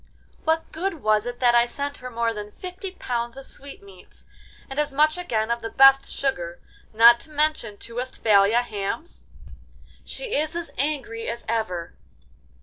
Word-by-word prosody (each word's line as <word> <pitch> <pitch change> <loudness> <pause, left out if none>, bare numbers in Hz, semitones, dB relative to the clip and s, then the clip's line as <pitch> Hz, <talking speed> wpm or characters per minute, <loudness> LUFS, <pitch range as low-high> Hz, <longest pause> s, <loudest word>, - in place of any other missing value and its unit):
What 320 +1 0
good 335 -1 -3
was 215 +1 +2
it 245 0 -5
that 240 -1 +5
I 240 0 +5
sent 285 +3 -3
her 255 - -7
more 230 -1 -1
than 210 -1 -6
fifty 365 - -7
pounds 240 -6 -3
of 270 - -7
sweetmeats, 200 -12 -11 0.4
and 270 +2 -4
as 300 -1 +1
much 305 +3 +3
again 235 -11 -1
of 235 0 -1
the 225 - -4
best 270 +1 +6
sugar, 175 -11 -2 0.3
not 235 +2 +7
to - - -12
mention 300 -8 0
two 230 +2 -10
Westphalia 225 -2 +3
hams? 215 - -5 0.8
She - - -4
is 310 +3 0
as 340 -1 -3
angry 265 -5 -2
as 235 +1 -4
ever. 215 -7 -2
245 Hz, 160 wpm, -24 LUFS, 225-300 Hz, 0.8 s, not